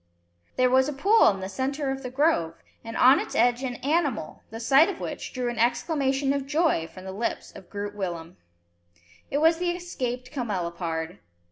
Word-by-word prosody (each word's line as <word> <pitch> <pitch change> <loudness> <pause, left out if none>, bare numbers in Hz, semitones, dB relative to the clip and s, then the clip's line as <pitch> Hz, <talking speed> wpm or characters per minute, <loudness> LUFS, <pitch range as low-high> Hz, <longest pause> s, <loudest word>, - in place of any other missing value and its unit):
There 255 0 +3
was 260 +2 +4
a - - -3
pool 400 +11 +5
in 195 -2 -2
the 190 - -4
centre 270 +7 -2
of 270 0 -4
the 255 - -5
grove, 255 - +1 0.3
and 230 0 -6
on 260 +3 +7
its - - -5
edge 240 +2 +3
an 255 -2 -3
animal, 290 - -1
the 225 - -7
sight 275 +8 +5
of 395 - -5
which - - -5
drew 250 -2 -3
an 240 -1 -3
exclamation 270 +3 +1
of 275 -1 -3
joy 300 - +1
from 185 - -12
the 190 - -5
lips 215 +5 -3
of 180 - -12
Groot 205 0 -5
Willem. 175 -4 -5 0.9
It 280 - -1
was 325 +2 +4
the 355 0 0
escaped 255 -8 -4
camelopard. 175 - -3
255 Hz, 190 wpm, -26 LUFS, 205-285 Hz, 0.9 s, on